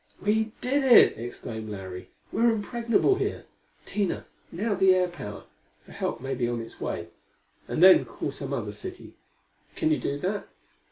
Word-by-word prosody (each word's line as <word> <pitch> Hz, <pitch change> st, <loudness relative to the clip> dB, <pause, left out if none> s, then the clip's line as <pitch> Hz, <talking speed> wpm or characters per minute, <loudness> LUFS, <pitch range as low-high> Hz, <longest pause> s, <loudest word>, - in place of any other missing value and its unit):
"We 220 Hz, +1 st, +1 dB
did 275 Hz, +3 st, +1 dB
it!" 255 Hz, -3 st, +7 dB
exclaimed 110 Hz, -2 st, -6 dB
Larry. 95 Hz, -3 st, -7 dB, 0.2 s
"We're 235 Hz, +1 st, +3 dB
impregnable 230 Hz, -, +1 dB
here. -, -, -2 dB, 0.4 s
Tina, 200 Hz, -4 st, -2 dB, 0.3 s
now 205 Hz, +5 st, -1 dB
the 190 Hz, -1 st, +5 dB
air 180 Hz, -1 st, +2 dB
power, 105 Hz, -13 st, -8 dB, 0.4 s
for -, -, -15 dB
help -, -, -3 dB
may 135 Hz, +2 st, -3 dB
be 125 Hz, -2 st, 0 dB
on 120 Hz, -1 st, -2 dB
its 115 Hz, 0 st, -9 dB
way. 85 Hz, 0 st, -3 dB, 0.6 s
And 165 Hz, -, +1 dB
then 185 Hz, 0 st, +8 dB
call -, -, -4 dB
some -, -, -6 dB
other -, -, -2 dB
city. 370 Hz, -1 st, -8 dB, 0.6 s
Can 315 Hz, -1 st, +1 dB
you 310 Hz, -, +2 dB
do 140 Hz, -, -2 dB
that? 195 Hz, +7 st, -3 dB
185 Hz, 165 wpm, -27 LUFS, -, 0.6 s, then